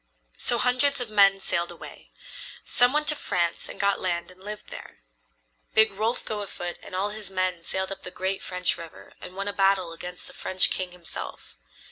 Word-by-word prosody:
So 240 Hz, -, +2 dB
hundreds 255 Hz, +3 st, +4 dB
of 240 Hz, -3 st, -2 dB
men 195 Hz, -2 st, +6 dB
sailed 175 Hz, -2 st, 0 dB
away. -, -, -12 dB, 0.6 s
Some 245 Hz, 0 st, +4 dB
went 300 Hz, +1 st, +1 dB
to 300 Hz, -, +4 dB
France 175 Hz, -, -1 dB
and -, -, -9 dB
got 200 Hz, -1 st, +2 dB
land 175 Hz, -1 st, -2 dB
and 185 Hz, +1 st, -17 dB
lived 210 Hz, +1 st, -7 dB
there. -, -, -10 dB, 0.8 s
Big 220 Hz, -1 st, +7 dB
Rolf 220 Hz, +5 st, -1 dB
go 210 Hz, -1 st, -2 dB
afoot 175 Hz, -3 st, -6 dB
and -, -, -8 dB
all 200 Hz, +2 st, 0 dB
his 210 Hz, -1 st, -4 dB
men 185 Hz, -2 st, -1 dB
sailed 190 Hz, +3 st, -1 dB
up 195 Hz, 0 st, -6 dB
the -, -, -7 dB
great 190 Hz, +1 st, -2 dB
French 180 Hz, -1 st, 0 dB
River 165 Hz, -1 st, -11 dB
and 185 Hz, -, -9 dB
won 195 Hz, +1 st, -3 dB
a 205 Hz, -, -1 dB
battle 195 Hz, -3 st, +2 dB
against 180 Hz, +2 st, -7 dB
the -, -, -9 dB
French 185 Hz, 0 st, +4 dB
king 185 Hz, -1 st, -2 dB
himself. 175 Hz, -2 st, -8 dB
195 Hz, 195 wpm, -26 LUFS, 180-210 Hz, 0.8 s, Big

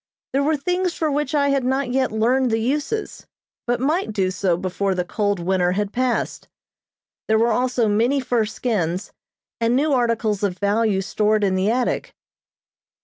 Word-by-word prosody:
There 275 Hz, -, +2 dB
were 305 Hz, +2 st, +1 dB
things 360 Hz, +4 st, -1 dB
for 315 Hz, -2 st, 0 dB
which 295 Hz, 0 st, -1 dB
I 280 Hz, -1 st, +3 dB
had 275 Hz, -2 st, +1 dB
not 265 Hz, 0 st, 0 dB
yet 260 Hz, 0 st, +1 dB
learned 245 Hz, +4 st, +2 dB
the 225 Hz, -, +1 dB
uses, 295 Hz, -, -2 dB, 0.4 s
but 240 Hz, 0 st, +1 dB
might 300 Hz, -, 0 dB
do 190 Hz, -3 st, 0 dB
so 185 Hz, -2 st, 0 dB
before 190 Hz, +1 st, -1 dB
the 180 Hz, -1 st, -1 dB
cold 205 Hz, 0 st, -1 dB
winter 180 Hz, 0 st, +1 dB
had 205 Hz, +1 st, -2 dB
passed. 255 Hz, 0 st, -1 dB, 0.8 s
There 220 Hz, -, +3 dB
were 230 Hz, +1 st, +3 dB
also 245 Hz, 0 st, +1 dB
many 230 Hz, +7 st, +2 dB
fur 245 Hz, -4 st, 0 dB
skins, 200 Hz, -5 st, -2 dB, 0.5 s
and 230 Hz, +1 st, +2 dB
new 290 Hz, +2 st, +2 dB
articles 230 Hz, -5 st, +1 dB
of 195 Hz, -3 st, -1 dB
value 205 Hz, 0 st, +1 dB
stored 210 Hz, +2 st, +1 dB
in 195 Hz, -2 st, +2 dB
the 190 Hz, +2 st, +1 dB
attic. 245 Hz, +2 st, -1 dB
230 Hz, 170 wpm, -22 LUFS, 200-265 Hz, 0.8 s, I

